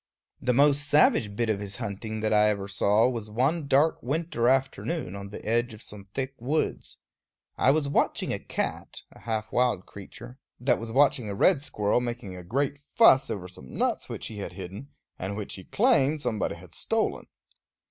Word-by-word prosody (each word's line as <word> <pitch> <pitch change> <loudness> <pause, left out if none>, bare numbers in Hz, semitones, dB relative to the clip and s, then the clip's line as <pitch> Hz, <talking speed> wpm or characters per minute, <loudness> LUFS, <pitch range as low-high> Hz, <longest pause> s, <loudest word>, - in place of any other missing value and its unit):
The 125 - +1
most 145 +2 +3
savage 115 -8 +4
bit 115 +2 0
of 110 -2 0
his 100 -1 -4
hunting 110 +2 -5
that 110 0 +1
I 105 0 +5
ever 100 -2 -2
saw 105 +3 +3
was 115 -4 -3
one 140 +8 0
dark 145 +4 +3
winter 135 -3 0
afternoon, 135 - -1
on 100 0 -7
the 105 - -9
edge 115 +1 0
of 110 - -13
some 100 -1 -11
thick 130 +7 -4
woods. 140 +7 -2 0.6
I - - +3
was 145 +1 +3
watching 140 - 0
a - - -3
cat, - - -4
a - - -16
half 110 -2 -3
wild 125 -7 +1
creature, 100 +6 -11 0.2
that 125 +2 +2
was 115 0 -6
watching 130 -3 +3
a 100 - -3
red 155 - +4
squirrel 105 -4 0
making 120 -5 -5
a 90 - -8
great 140 +9 -1 0.2
fuss 180 - +6
over 90 -3 -4
some 75 -8 -11
nuts - - 0
which - - -5
he 110 - -7
had 100 - -6
hidden, 95 +8 -8 0.3
and 100 +2 -4
which 105 - -5
he 95 - -8
claimed 155 - +3
somebody 120 -6 -2
had - - -15
stolen. - - -1
120 Hz, 190 wpm, -27 LUFS, 100-140 Hz, 0.6 s, fuss